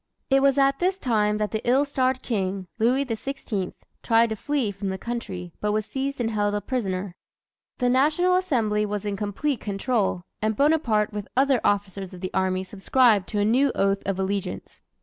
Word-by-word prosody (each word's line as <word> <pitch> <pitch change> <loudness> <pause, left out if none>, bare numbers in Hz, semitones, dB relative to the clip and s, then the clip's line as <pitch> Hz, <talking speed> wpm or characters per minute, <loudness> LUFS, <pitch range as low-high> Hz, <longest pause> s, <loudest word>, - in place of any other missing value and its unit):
It 270 0 +5
was 275 0 +3
at 275 0 +3
this 370 +2 +1
time 210 - +1
that 210 0 -1
the 220 - -2
ill 260 +4 +3
starred 260 -2 0
king, 195 -4 -2
Louis 255 +5 +2
XVI, 225 -5 -3 0.3
tried 230 0 +3
to 220 - -2
flee 270 -2 -1
from 200 0 -4
the 190 - -3
country, 190 -6 -5
but 210 0 0
was 215 -1 0
seized 275 +2 -3
and 230 -2 0
held 205 -1 0
a - - +1
prisoner. 195 -6 -3 0.6
The 250 - +1
National 305 +8 +3
Assembly 235 - +1
was 210 0 -3
in 205 -1 -1
complete 215 +7 -2
control, 200 -2 -1 0.2
and 215 0 0
Bonaparte 255 -7 +2
with 205 -1 -5
other 270 -2 +3
officers 195 -2 -1
of 180 - -12
the 185 - -4
army 185 0 0
subscribed 205 +1 +2
to 210 - -1
a 205 - +2
new 260 +6 +3
oath 195 0 +1
of 195 -1 0
allegiance. 190 - -3
215 Hz, 190 wpm, -25 LUFS, 200-265 Hz, 0.6 s, It